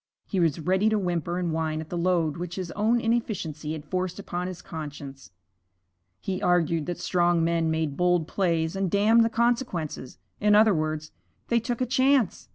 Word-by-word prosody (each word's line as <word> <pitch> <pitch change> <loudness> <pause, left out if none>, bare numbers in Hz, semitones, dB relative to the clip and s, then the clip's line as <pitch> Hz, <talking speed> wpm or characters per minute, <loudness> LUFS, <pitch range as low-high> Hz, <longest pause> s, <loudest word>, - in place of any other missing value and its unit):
He 195 - -2
was 165 -3 +2
ready 185 +6 +2
to 215 - +1
whimper 175 -3 -2
and 175 -2 -1
whine 160 -1 -1
at 160 -1 -7
the - - -4
load 170 -4 +1
which 175 0 -5
his 185 -3 -5
own 220 +3 +1
inefficiency 195 -10 -2
had 155 -1 -7
forced 185 +2 -2
upon 180 -2 -4
his 180 -2 -7
conscience. 145 -6 -8 0.9
He 185 -1 -4
argued 170 -3 +1
that 175 - -3
strong 175 -2 +1
men 165 -1 +1
made 160 -3 -1
bold 180 -2 +2
plays 165 -3 0
and 195 -1 0
damned 215 +5 +4
the 225 - +2
consequence; 230 - -1 0.2
in 210 0 +4
other 215 0 +6
words, 155 -1 -2 0.4
they 235 - +3
took 240 +1 -3
a - - +3
chance. 260 -3 +2
175 Hz, 180 wpm, -26 LUFS, 160-205 Hz, 0.9 s, other